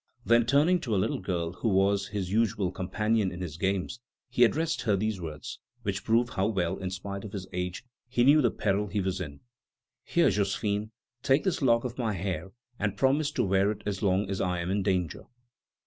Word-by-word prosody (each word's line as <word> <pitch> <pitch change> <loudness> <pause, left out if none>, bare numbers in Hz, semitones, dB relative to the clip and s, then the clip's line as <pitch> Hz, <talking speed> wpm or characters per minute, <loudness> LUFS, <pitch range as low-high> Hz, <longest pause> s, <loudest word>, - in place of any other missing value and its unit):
Then, 120 0 +4
turning 155 +7 +4
to 115 -9 -2
a - - +2
little 100 +4 0
girl 85 -3 -2
who 110 +5 -1
was 100 0 +2
his 100 -3 -4
usual 105 -4 +1
companion 105 +2 0
in 90 - -7
his 85 -5 -5
games, 95 +7 -1 0.3
he 125 0 +4
addressed 160 +7 +2
her 105 -4 +2
these 105 -1 -1
words, 80 -3 -7 0.2
which - - -2
prove 120 +2 +2
how 95 - 0
well, 90 -6 0
in 95 - -3
spite 100 +1 -5
of 105 -1 -8
his 95 -3 -4
age, 90 +5 -3 0.2
he 120 -1 +2
knew 145 +4 +6
the 120 - +4
peril 105 0 0
he 100 +1 -2
was 95 -1 -1
in: 70 -5 -7 0.6
"Here, 170 -7 +3
Josephine, 100 +1 -1 0.3
take 135 +2 +3
this 190 -5 0
lock 115 -3 +4
of 125 0 -5
my 115 -3 0
hair, 95 -1 -3 0.3
and 100 -1 -1
promise 140 +5 +2
to - - +1
wear 95 +1 +3
it 105 - -4
as 100 -2 -2
long 95 0 +2
as 95 0 -2
I 90 -1 0
am 85 +2 -2
in 100 +1 +1
danger." 90 -5 -1
100 Hz, 210 wpm, -28 LUFS, 95-115 Hz, 0.6 s, knew